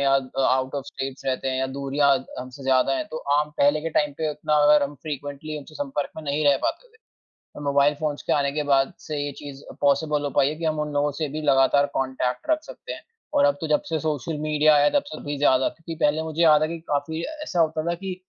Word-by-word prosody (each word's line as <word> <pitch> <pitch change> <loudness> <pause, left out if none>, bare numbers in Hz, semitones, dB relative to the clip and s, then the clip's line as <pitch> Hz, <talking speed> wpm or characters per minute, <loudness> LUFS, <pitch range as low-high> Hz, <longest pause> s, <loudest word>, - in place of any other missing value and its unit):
या 135 -1 +3
अ, 135 0 -3
out 130 +1 0
of 140 -2 -3
states 135 -1 -6
रहते 135 0 -1
हैं 130 0 -1
या 130 - 0
दूरियाँ 140 0 +2
द 130 - -12
हमसे 130 +2 -8
ज़्यादा 130 0 +3
हैं। - - -2
तो 160 - -4 0.2
आम 150 0 0
पहले 145 +2 +4
के 165 +1 -3
टाइम 150 -1 +1
पे 155 -1 0
उतना 150 +1 -1
अगर 150 0 +6
हम 145 +1 -2
फ्रिक्वेंटली 145 0 -5
उनसे 150 +2 -12
संपर्क 145 -1 -3
में 160 - -6
नहीं 145 +1 -1
रह 140 - +5
पाते 345 +10 -2
थे। 450 - -26 0.6
तो - - -7
मोबाइल 140 +1 +3
फ़ोन्स 150 -2 -2
के - - -1
आने 140 -1 +2
के 150 +1 -1
बाद 135 -1 +3
से 155 - -5
ये 145 0 -2
चीज़ 140 0 -10 0.2
पॉसिबल 145 +1 +2
हो 145 - -1
पाई 135 0 +3
है 150 - -3
कि 165 - -6
हम 155 -1 0
उन 150 0 -3
लोगों 145 0 +1
से 155 -2 -1
भी 155 +3 -5
लगातार 140 0 +4
कांटेक्ट 130 - -2
रख 310 0 +2
सकते - - -9
हैं। - - -9 0.3
और 285 0 +4
अब 285 - +4
तो 160 - -2
जब 150 - +2
से 160 - 0
सोशल 150 0 -2
मीडिया 155 0 +3
आया 145 0 +5
तब - - -2
से 290 - -7
थोड़ी 145 0 -4
ज़्यादा। 130 -2 +3
क्योंकि 165 0 -9
पहले 150 +2 +2
मुझे 160 +1 -2
याद 155 -2 +6
है 155 - +1
कि 170 0 -5
काफ़ी 155 +3 -1 0.2
ऐसा 180 - -1
होता 160 -1 +1
था - - 0
कि 185 +1 -5
145 Hz, 255 wpm, -24 LUFS, 140-155 Hz, 0.6 s, अगर